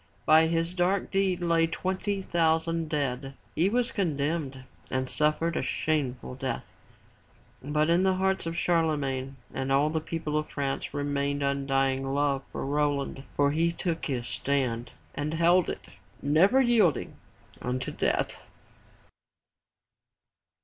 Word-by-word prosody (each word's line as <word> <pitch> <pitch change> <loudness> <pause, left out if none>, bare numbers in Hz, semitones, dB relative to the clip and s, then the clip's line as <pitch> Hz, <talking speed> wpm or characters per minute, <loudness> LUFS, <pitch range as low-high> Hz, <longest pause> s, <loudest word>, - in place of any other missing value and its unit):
By 160 +1 +6
his 165 +1 0
dark 185 +2 +1
deed 195 -2 +1
lay 165 -1 +3
twenty 190 +3 -2
thousand 165 -1 +1
dead. 135 -2 -2 0.2
He 175 +4 +2
was 245 +3 +1
condemned 145 -6 -1 0.3
and 130 0 -1
suffered 155 +4 +1
a - - 0
shameful 130 -3 -1
death. 130 -2 -4 0.9
But 150 +3 +1
in 170 +2 +4
the 190 0 +3
hearts 190 -2 0
of 165 0 -3
Charlemagne 145 -6 0 0.2
and 135 0 -2
all 145 +3 +3
the 160 0 -1
people 155 -1 -2
of 155 - -5
France 140 -2 -3
remained 140 0 -1
undying 135 -1 0
love 140 -1 +1
for - - -4
Roland, 140 -1 -1
for 140 0 +3
he 165 +3 +2
took 170 -1 -3
his 125 -5 -2
stand, 125 -4 -1 0.2
and 150 +2 -2
held 170 +2 +4
it, - - -5 0.3
never 170 - +4
yielding, 225 - +2 0.4
unto 125 +1 -2
death. - - -1
150 Hz, 130 wpm, -28 LUFS, 140-170 Hz, 0.9 s, By